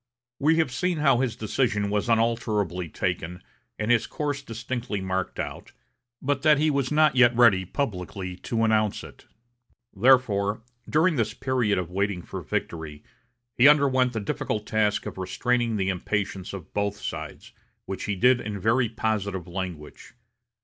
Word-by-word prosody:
We 155 +3 +3
have 160 -5 +1
seen 180 +6 -1
how 135 -5 +3
his 125 -4 0
decision 105 -2 0
was 105 +2 -1
unalterably 110 -6 0
taken 90 +1 -3 0.3
and 110 +2 0
his 120 -2 +3
course 145 -2 -3
distinctly 115 -3 -4
marked 95 -1 -3
out, - - -6 0.5
but 140 0 0
that 150 -1 +5
he 155 +1 +2
was 140 -2 -1
not 150 -2 +4
yet 125 -1 +5
ready 110 -6 +5
publicly 95 - -4
to 115 +4 -2
announce 110 -2 +1
it. - - -14 0.7
Therefore, 110 -2 +3 0.3
during 160 +1 +3
this 110 -1 -1
period 130 -5 0
of 90 -1 -3
waiting 100 -1 -1
for - - -7
victory, 80 -3 -4 0.5
he 125 +5 +6
underwent 130 -4 +4
the 110 - -2
difficult 105 +1 -3
task 105 -1 0
of - - -6
restraining 120 +5 0
the 95 -2 0
impatience 95 0 -2
of 95 -5 -9
both 100 0 -1
sides, 80 -7 -7 0.3
which 95 - -5
he 105 - -1
did 125 +5 +4
in 105 -1 -5
very 115 +4 +2
positive 100 -5 -2
language. 90 +1 -7
110 Hz, 155 wpm, -25 LUFS, 95-130 Hz, 0.7 s, he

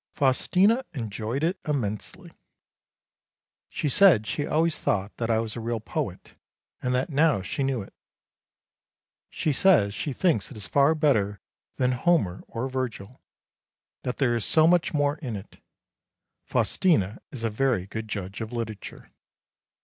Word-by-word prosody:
Faustina 185 - +3
enjoyed 115 +1 -3
it 180 +4 0
immensely. 110 -9 -3 1.4
She - - -2
said 140 - +5
she 145 +6 -2
always 160 +1 +1
thought 100 +1 -1
that 115 -1 -2
I 115 - +3
was 110 -1 -2
a - - -4
real 115 0 -2
poet, 110 - -5 0.5
and 125 0 0
that 130 +5 -1
now 140 -9 +3
she 100 - -3
knew 135 -5 0
it. - - -16 1.4
She 155 - -1
says 140 - +4
she 145 - -3
thinks 145 - +1
it 130 - -10
is 105 - -5
far 140 +3 +3
better 105 - +1 0.4
than 125 0 +1
Homer 125 - +1
or 115 +3 -3
Virgil; 130 -4 -5 0.8
that 125 - -4
there 120 -4 +2
is 115 - -1
so 155 -1 +4
much 175 0 +3
more 145 0 +1
in 130 -8 -5
it. 100 0 -10 0.9
Faustina 110 - +1
is 125 -5 -7
a 115 - 0
very 115 -4 +1
good 110 +2 -6
judge 100 0 -5
of 110 +1 -5
literature. 110 -4 -6
125 Hz, 150 wpm, -26 LUFS, 110-150 Hz, 1.4 s, said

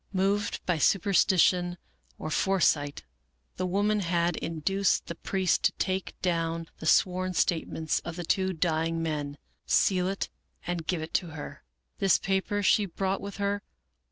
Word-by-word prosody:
Moved 195 +2 0
by 175 -3 +1
superstition 180 0 +3 0.4
or 155 - -5
foresight, 150 - +1 0.5
the 185 - -1
woman 205 +3 +1
had 170 -2 +1
induced 180 +5 0
the - - -5
priest 185 +1 0
to - - +5
take 190 0 -3
down 165 -2 -1
the 160 - -4
sworn 185 +2 +2
statements 160 -2 0
of 170 0 -7
the 175 - -4
two 190 +2 +1
dying 165 -1 0
men, 145 -2 -3 0.3
seal 185 -2 +3
it, 195 +1 -3 0.3
and 175 -2 -3
give 170 -4 -1
it 160 - -8
to 180 - +1
her. 160 -2 -8 0.4
This 195 -2 +4
paper 195 +2 -1
she 200 +1 +4
brought 190 +2 -2
with 200 0 -7
her. 200 0 -1
180 Hz, 150 wpm, -28 LUFS, 165-195 Hz, 0.5 s, to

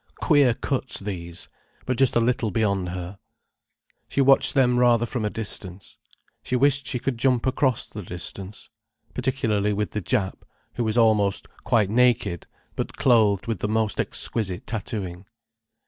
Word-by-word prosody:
Queer 145 -7 +4
cuts 130 0 -2
these!—but 90 +6 -7
just 135 0 +3
a - - +5
little 120 0 +1
bit 110 +3 -1
beyond 100 -4 0
her. 90 +2 -7 0.9
She - - -3
watched 135 +1 +4
them 125 -2 +3
rather 120 -1 +4
from 120 -1 -4
a 105 - 0
distance. 100 -4 -5 0.4
She 125 - -3
wished 140 +2 +3
she 130 - -1
could 125 -1 -3
jump 125 -1 +2
across 130 -1 0
the 105 - -8
distance. 95 +4 -6 0.4
Particularly 110 -5 0
with 105 0 -2
the 105 - -3
Jap, 95 -2 -1 0.3
who 120 - -2
was 110 +1 -1
almost 105 -4 +2 0.2
quite 110 -5 +2
naked, 120 -8 +2 0.3
but - - -4
clothed 110 -6 +3
with 115 -5 -3
the 105 - -2
most 110 -1 0
exquisite 95 -4 -1
tattooing. 100 -5 -5
110 Hz, 150 wpm, -24 LUFS, 100-125 Hz, 0.9 s, a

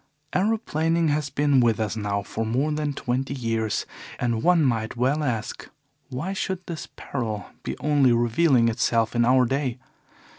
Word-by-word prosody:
"Aeroplaning 170 -6 +1
has 145 -1 0
been 145 0 +2
with 115 -2 +3
us 110 -1 -1
now 100 -2 -2
for 110 +3 -4
more 130 +7 0
than 150 -1 -1
twenty 130 +1 -2
years, 115 -4 -1 0.3
and 120 -2 0
one 175 +1 +4
might 110 -3 0
well 135 +5 +1
ask: 115 -6 -3 0.4
Why 145 +9 -3
should 190 -1 -3
this 170 -2 -6
peril 110 -6 -4
be - - -5
only 145 -4 +3
revealing 120 +2 +3
itself 115 0 +1
in 120 0 +3
our 130 +1 +5
day? 135 -1 -1
130 Hz, 155 wpm, -25 LUFS, 115-150 Hz, 0.4 s, our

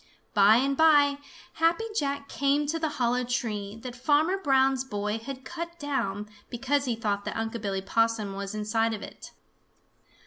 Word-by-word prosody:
By 205 0 +6
and 275 +3 +2
by 290 -2 +5 0.3
Happy 330 +6 +2
Jack 280 -4 -1
came 280 +2 +1
to 320 +3 -1
the 315 -1 0
hollow 245 0 +1
tree 220 -4 -3
that 250 -2 -6
Farmer 295 +8 +2
Brown's 265 -4 +3
boy 210 -3 -3
had 260 +3 -8
cut 340 0 -6
down 235 -10 -2 0.2
because 270 +4 0
he 245 -3 0
thought 205 -3 -2
that - - -3
Unc' 225 0 -3
Billy 195 -2 -2
Possum 225 -1 +1
was 200 +1 -5
inside 225 +1 0
of 210 - -8
it. - - -10
250 Hz, 165 wpm, -27 LUFS, 215-285 Hz, 0.3 s, By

